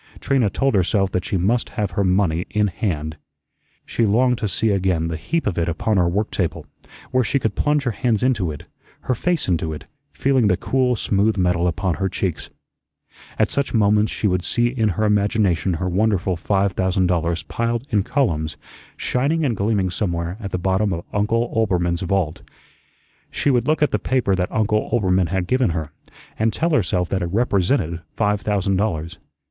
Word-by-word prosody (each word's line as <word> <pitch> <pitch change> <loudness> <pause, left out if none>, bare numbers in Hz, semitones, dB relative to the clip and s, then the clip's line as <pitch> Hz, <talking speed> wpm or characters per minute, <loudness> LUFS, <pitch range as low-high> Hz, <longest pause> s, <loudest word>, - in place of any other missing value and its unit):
Trina 130 -6 +1
told 135 +7 0
herself 95 0 +2
that 90 - -1
she 95 - -1
must 110 +7 +1
have 105 -3 -1
her 100 - 0
money 90 -3 +1
in 105 -1 +1
hand. 80 -5 -3 0.7
She 115 - -1
longed 120 +3 +3
to 105 - -1
see 110 +2 0
again 90 -4 0
the 80 - -3
heap 165 - -2
of 95 -5 -1
it 85 - 0
upon 100 +6 0
her 90 -2 +3
work 105 +5 -1
table, 90 -4 -2 0.5
where 130 0 +3
she 140 - 0
could 110 -6 -1
plunge 150 -1 +1
her 125 - 0
hands 115 -2 0
into 110 -10 +1
it, 75 - -8 0.4
her 130 - -1
face 175 +7 -1
into 80 -3 0
it, 75 - -8 0.3
feeling 130 -5 +2
the 90 -3 +2
cool, 130 -2 +1
smooth 105 0 +1
metal 90 -1 +2
upon 90 0 -1
her 95 - +1
cheeks. 90 -3 -3 0.9
At - - +2
such 140 -3 -1
moments 105 0 +3
she - - -4
would 90 -3 +1
see 120 +4 +2
in 115 -4 0
her 100 +3 -1
imagination 100 -4 +1
her 90 +3 -2
wonderful 95 -1 +1
five 95 +3 0
thousand 95 0 +1
dollars 85 -2 0
piled 115 - -2
in 105 -3 +3
columns, 95 - -1 0.4
shining 150 +6 0
and 120 -5 0
gleaming 100 -2 0
somewhere 85 -2 -2
at 100 -4 -5
the 90 - -2
bottom 95 +2 +1
of 85 0 -5
Uncle 115 +3 0
Oelbermann's 90 -5 +1
vault. 95 -4 -1 0.9
She 145 - 0
would 125 0 +1
look 155 0 +2
at 150 - +2
the - - 0
paper 125 -7 +1
that 90 -1 -1
Uncle 105 0 0
Oelbermann 95 -6 +2
had 95 +1 -1
given 125 +4 +2
her, 80 -3 -3 0.5
and 110 +1 +2
tell 165 +7 -1
herself 90 - +1
that 95 - -1
it 85 - -1
represented 100 - +1
five 105 -1 +1
thousand 100 -2 0
dollars. 85 -4 -2
100 Hz, 190 wpm, -21 LUFS, 90-115 Hz, 0.9 s, longed